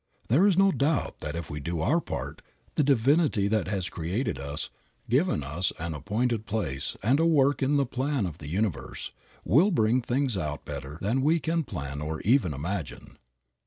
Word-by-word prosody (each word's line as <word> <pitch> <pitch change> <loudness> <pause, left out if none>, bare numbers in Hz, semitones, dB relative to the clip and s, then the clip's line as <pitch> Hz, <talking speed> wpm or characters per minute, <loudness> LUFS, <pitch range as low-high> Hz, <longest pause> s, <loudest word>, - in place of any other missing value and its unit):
There 160 - +5
is 190 -4 +3
no 195 0 +5
doubt 150 -1 0
that 75 +1 -4
if 85 - -5
we 75 - -4
do 85 +3 -3
our 150 - +2
part, - - -5 0.3
the 150 - +2
Divinity 140 -4 +3
that 105 -5 +1
has 95 -2 -1
created 85 - -2
us, 70 +2 -4 0.4
given 135 - +2
us 80 +6 -1
an 85 0 -3
appointed 110 - -1
place 85 -11 -2
and 130 +7 +3
a 165 - +3
work 145 -3 +3
in 140 +2 +2
the 140 - +3
plan 130 -1 -1
of 85 -3 -6
the 75 - -8
universe, 100 +3 -2 0.3
will 155 - +5
bring 125 - +2
things 125 0 0
out 75 -4 -4
better 70 0 -6
than 115 +7 +1
we 160 +5 +3
can 165 +1 0
plan 70 - -5
or 80 +1 -3
even 115 - +3
imagine. 80 +4 -5
110 Hz, 185 wpm, -27 LUFS, -, 0.4 s, There